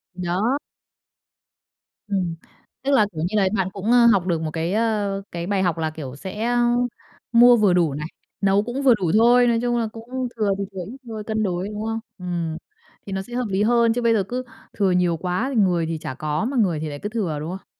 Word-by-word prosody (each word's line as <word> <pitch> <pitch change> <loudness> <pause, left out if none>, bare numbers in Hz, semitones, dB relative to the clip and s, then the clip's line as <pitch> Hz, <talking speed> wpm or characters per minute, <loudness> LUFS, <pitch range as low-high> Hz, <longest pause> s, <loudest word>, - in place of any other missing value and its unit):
Th 180 - -7
đó. 210 +10 +1 1.5
Ừm. 185 -5 -1 0.5
Tức 280 - 0
là, 220 -6 +5
kiểu 155 -2 -5
như 215 - -4
là, 195 - +3
bạn 190 -2 +1
cũng, 205 +4 -2
ơ, 245 -1 +6
học 200 -6 +4
được 165 -2 0
một 155 -1 -3
cái, 165 +3 -2
ờ, 210 -3 0
cái 170 0 -4
bài 195 -1 +1
học 175 -3 0
là, 160 -1 -1
kiểu, 145 -5 -7
sẽ, 190 +8 -6
a, 240 +1 +2 0.7
mua 240 +1 +7
vừa 205 -5 +4
đủ 170 -5 +2
này, 150 +2 -4 0.3
nấu 200 +1 +3
cũng 245 +4 -4
vừa 260 -3 +7
đủ 180 -6 -1
thôi, 245 +2 +5
nói 230 -1 +2
chung 240 0 0
là 230 -1 0
cũng 250 +3 -4
thừa 210 -2 +1
thì 200 - -2
thừa 190 -2 -5
ít 245 +7 -9
thôi, 220 -2 -5
cân 220 0 -1
đối, 185 -1 -1
đúng 210 0 -5
không? 225 0 -2 0.2
Ừm, 170 -3 -3 0.5
thì 195 - -6
nó 190 - -1
sẽ 240 +5 -11
hợp 245 0 -1
lý 195 +2 +1
hơn, 235 0 +3
chứ 245 - -1
bây 230 -1 +3
giờ 205 -3 +2
cứ 250 +6 -4 0.3
thừa 195 -3 +1
nhiều 175 -2 +2
quá, 180 - -1
thì 220 - +4
người 175 -4 +2
thì 165 0 -3
chả 155 -4 -6
có, 150 +6 -2
mà 265 +1 -2
người 180 -9 +2
thì 155 0 -4
lại 145 -1 -7
cứ 205 - -4
thừa, 190 -10 -2
đúng 155 +2 -5
không? - - -22
200 Hz, 245 wpm, -23 LUFS, 175-230 Hz, 1.5 s, mua